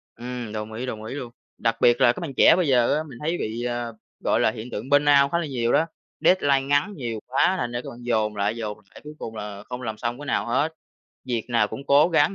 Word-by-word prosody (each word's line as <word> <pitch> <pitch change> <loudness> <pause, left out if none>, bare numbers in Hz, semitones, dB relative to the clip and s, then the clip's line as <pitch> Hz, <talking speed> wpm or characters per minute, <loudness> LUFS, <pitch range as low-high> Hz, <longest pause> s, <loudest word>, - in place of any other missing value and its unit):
Ừm, 120 -2 -6
đồng 110 0 -5
ý, 120 +4 -4
đồng 110 -4 -5
ý 110 - -6
luôn! 125 -4 -6 0.3
Đặc 115 -1 +1
biệt 120 0 +5
là 120 - +6
các - - -8
bạn 165 -6 -5
trẻ - - +7
bây 180 -2 +1
giờ 125 -2 +4
á, 155 - -1
mình 125 - -10
thấy 165 +3 -1
bị, 115 -2 -3
ờ, 120 -1 -3 0.3
gọi - - +1
là - - +3
hiện 115 +2 -8
tượng 115 +6 -5
Burnout 145 -1 +5
khá - - +2
là 170 - -2
nhiều 120 -5 -1
đó, 160 - +4 0.4
deadline 145 -7 +4
ngắn 145 +9 +1
nhiều 120 -7 -4
quá 135 +8 +2
thành 120 - -2
ra 120 0 -3
các - - -7
bạn 120 - -11
dồn 110 -3 0
lại, 105 +2 0
dồn 110 -3 -4
lại - - -14
cuối 150 0 -9
cùng 110 - -6
là 105 -1 -7
không 125 0 -5
làm 110 -3 -4
xong 120 +3 -3
cái 145 - -7
nào - - 0
hết, 140 +7 0 0.5
việc 120 -4 -2
nào 115 -3 +2
cũng 140 +5 -8
cố 145 +4 +5
gắng, 165 +2 +3
120 Hz, 265 wpm, -24 LUFS, 115-145 Hz, 0.5 s, trẻ